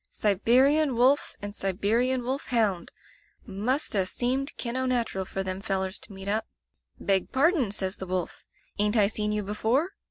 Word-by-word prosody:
'Siberian 255 +8 +3
wolf 255 +4 +3
and 205 0 -4
Sibe 195 -1 -3
rian 245 +5 +2
wolf 265 +3 -3
hound! 210 -8 0 0.5
Must 235 +8 -1
'a 190 -3 +1
seemed 260 +7 -1
kin' 235 0 -3
o' 260 0 0
natural 235 -6 -1
for 195 +1 -3
them 190 0 -4
fellers 190 -2 -2
to - - -11
meet 195 0 -8
up. 215 +2 0 0.5
"Beg 195 -2 +1
pardon," 285 - +3
says 190 -1 -2
the 190 - -7
wolf, 180 -1 -3 0.4
"ain't 210 +2 +2
I 210 - +6
seen 210 0 -1
you 210 0 -1
be 200 +2 -4
fore?" 260 - +1
215 Hz, 180 wpm, -27 LUFS, 195-255 Hz, 0.5 s, I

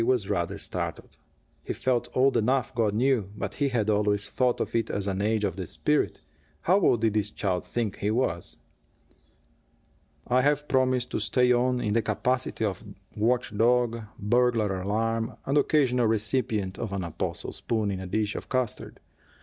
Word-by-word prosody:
was 120 -4 +1
rather 85 -1 -1
startled. - - -4 0.5
He - - -3
felt 125 -2 0
old 135 +1 +4
enough, 125 +3 +1
God 110 -4 +1
knew, 120 -4 +2
but - - -4
he 140 -1 0
had 115 -5 0
always 105 -1 +1
thought 125 -2 +1
of - - -3
it 115 -1 0
as 100 - -2
an 100 -1 -1
age 110 +1 +1
of 95 -3 -1
the 95 -3 -4
spirit. 150 - 0 0.4
How 185 +4 +4
old 120 - +3
did 110 -2 +2
this 105 -2 +1
child 90 -3 -2
think 115 -5 -2
he 105 - -1
was? 110 -7 -1 1.7
"I 125 +1 +3
have 145 +2 +1
promised 130 -1 +1
to - - -1
stay 125 +5 +2
on, 125 +1 +2
in 105 - 0
the 115 - +3
capacity 115 +2 -1
of 100 -1 -3 0.3
watch 115 0 0
dog, 115 +1 +2 0.2
burglar 110 -3 +1
alarm, 115 +3 -1
and 135 - 0
occasional 125 -6 +2
recipient 110 -3 -1
of 110 -4 -4
an 95 -1 -2
apostle 85 -2 -4
spoon 110 -3 -1
in 95 - -3
a 95 - -6
dish 105 +2 -1
of - - -7
custard. 130 -4 -2
115 Hz, 175 wpm, -27 LUFS, 105-125 Hz, 1.7 s, old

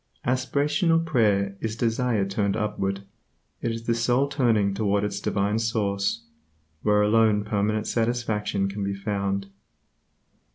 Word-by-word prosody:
Aspiration 145 +6 +1
or 165 - +5
prayer 105 -11 +1
is 110 -1 -2
desire 115 -2 0
turned 100 +1 -1
upward. 100 -2 -2 0.6
It - - -1
is 115 0 -5
the 115 - +2
soul 120 +4 +2
turning 115 -8 +2
toward 100 -1 0
its 100 -1 -2
Divine 100 +2 0
source, 100 -3 -1 0.6
where 105 -1 +3
alone 105 -1 +3
permanent 105 0 0
satisfaction 115 -4 -1
can 100 +1 -4
be 100 0 -2
found. 100 -1 -2
105 Hz, 130 wpm, -25 LUFS, 100-115 Hz, 0.6 s, or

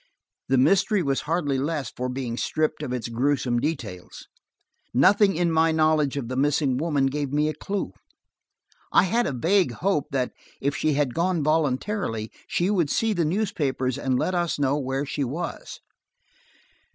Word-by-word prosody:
The 130 - +2
mystery 195 - +3
was 135 -2 0
hardly 145 -5 0
less 145 -3 -2
for 125 0 -3
being 125 -2 -3
stripped 155 +5 -1
of 150 - -4
its 125 -2 -3
gruesome 125 0 0
details. 115 - -5 0.7
Nothing 195 - +5
in 170 0 +1
my 160 0 +3
knowledge 155 -3 +2
of 130 -4 -3
the 130 - -4
missing 140 -1 +1
woman 145 -2 +1
gave 140 0 -2
me 150 +1 +2
a 155 - -1
clue. 200 +4 -4 1.0
I - - +5
had 230 +6 +1
a - - -1
vague 165 +3 +2
hope 185 0 0
that, 130 -2 -1 0.3
if 140 +1 -1
she 155 - +1
had 140 -3 0
gone 170 -1 0
voluntarily, 150 - 0 0.2
she 180 +3 0
would 175 -8 +1
see 225 +6 +1
the 175 -4 +1
newspapers 150 - -1
and 130 -1 0
let 185 - 0
us 175 -2 0
know 140 -1 +1
where 135 +1 -2
she 145 0 -2
was. 160 +7 -5
145 Hz, 165 wpm, -25 LUFS, 130-170 Hz, 1.0 s, Nothing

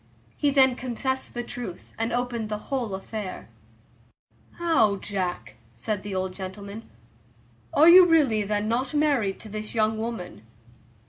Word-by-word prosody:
He 290 - +1
then 265 -2 +4
confessed 260 +1 -3
the 240 - -2
truth, 235 -7 -8
and 225 +1 -2
opened 240 -2 -2
the 210 - -2
whole 235 -3 -3
affair. 195 0 -6 1.0
"How, 320 -12 +2
Jack?" 190 -2 -4 0.2
said 200 - -3
the 200 -1 -5
old 185 0 -2
gentleman, 200 +3 -7
"and - - -23 0.9
are 310 +3 +7
you 355 +1 +10
really 285 -10 +4
then 210 +1 -1
not 250 +5 -1
married 280 -10 +1
to 215 - -9
this 215 +2 -6
young 220 0 +1
woman?" 220 - -5
220 Hz, 145 wpm, -26 LUFS, 200-260 Hz, 1.0 s, you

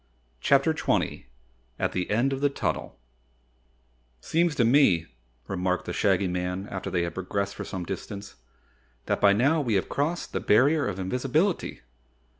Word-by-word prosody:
CHAPTER 140 - +3
20 150 - -1 0.5
At - - 0
the 90 -1 -2
End 120 +6 +2
of 135 - -4
the 145 - +3
Tunnel 140 - -3 1.2
"Seems 165 - +1
to 120 -6 +3
me," 115 - +4 0.4
remarked 90 -1 -1
the - - -4
Shaggy 95 -2 +2
Man 90 +2 -3
after 95 - -4
they 90 -1 0
had 85 -1 -3
progressed 100 +2 -2
for - - -6
some 95 -3 -5
distance, 100 +3 -6 0.7
"that - - -1
by 100 - +6
now 140 +10 +3
we 120 -6 -1
may - - +3
have 95 - 0
crossed 160 +5 -2
the - - 0
Barrier 140 +7 +3
of 90 - -3
Invisibility." 135 - -1
105 Hz, 160 wpm, -26 LUFS, 95-140 Hz, 1.2 s, by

